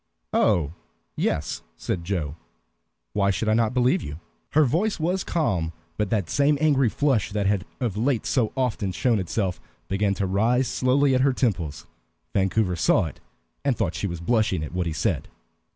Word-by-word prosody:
"Oh, 80 -3 +2 0.4
yes," - - -1 0.2
said 85 +7 -3
Joe. 85 -5 -2 0.8
"Why 100 0 +2
should 105 +3 -1
I 110 - +4
not 115 +1 +2
believe 125 +1 +3
you?" 75 +2 -7 0.3
Her 155 0 +5
voice 175 - 0
was 180 +4 0
calm, 90 - 0 0.2
but 105 -2 -1
that 100 -6 0
same 145 - +3
angry 140 -5 +3
flush 130 -5 +1
that 105 -1 0
had 100 -1 +1
of 115 -7 -2
late 120 0 +1
so 120 -5 +1
often 115 -7 0
shown 115 +2 +2
itself 95 0 -2 0.3
began 100 0 +1
to 100 - -1
rise 115 +7 +2
slowly 135 +3 +2
at 130 - +3
her 135 0 +3
temples. 90 - -1 0.5
Vancouver 95 -1 +1
saw 85 +3 +3
it, 75 - -8 0.4
and 135 -5 +1
thought - - 0
she 100 - -2
was 85 -2 -5
blushing 105 -3 +1
at 75 - -6
what 90 -1 -1
he 80 - -2
said. 75 - -1
105 Hz, 175 wpm, -25 LUFS, 90-130 Hz, 0.8 s, Her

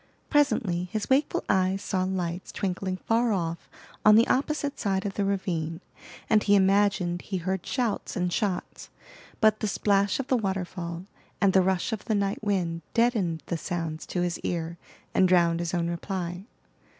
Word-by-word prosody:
Presently 215 -12 +2
his 215 +3 -3
wakeful 280 +3 +2
eyes 190 0 +2
saw 185 -2 0
lights 180 -1 -3
twinkling 185 -1 -2
far 230 +4 +1
off 170 -4 -2 0.3
on 210 0 +8
the 230 +2 +6
opposite 285 +1 0
side 195 -1 0
of 200 - -2
the 200 - -1
ravine, 170 -5 -2 0.5
and 215 -1 +4
he 205 0 +4
imagined 195 -2 +2
he 195 - -4
heard 185 +1 -2
shouts 240 -6 -2
and 180 -1 -1
shots. 195 -3 -2 0.5
But 215 -1 +4
the 215 - -1
splash 200 +1 +1
of 270 - -1
the 260 -1 +2
waterfall, 180 -4 -3 0.3
and 195 -2 +3
the 190 - +6
rush 190 +4 0
of 215 - -5
the 220 - +1
night 200 +1 -1
wind 175 -5 -1
deadened 215 -9 +1
the 170 - -2
sounds 165 -2 -4
to 180 - -2
his 175 -1 -1
ear, 170 0 -3 0.3
and 185 - +4
drowned 170 -2 +3
his 170 -1 -2
own 170 -2 0
reply. 175 +1 -4
190 Hz, 170 wpm, -27 LUFS, 175-205 Hz, 0.5 s, on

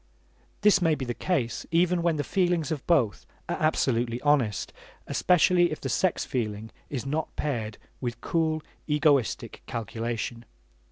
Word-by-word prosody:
This 205 -2 +5
may 165 -3 +3
be 135 -2 -4
the 120 - -2
case 125 -6 -1
even 175 +1 +2
when 170 -1 +2
the 145 - -1
feelings 175 -2 +1
of 150 -4 -4
both 130 - +2 0.2
are - - -2
absolutely 120 -6 +1
honest, 135 -8 +1 0.3
especially 175 -1 +3
if 155 - -4
the 135 - -4
sex 185 +6 +1
feeling 110 -3 -3 0.2
is 135 -4 -4
not 150 +3 -2
paired 115 -8 -2 0.2
with 120 -2 -4
cool 160 -2 0 0.2
egoistic 150 -5 +1
calculation. 115 +1 -4
145 Hz, 145 wpm, -27 LUFS, 120-165 Hz, 0.3 s, This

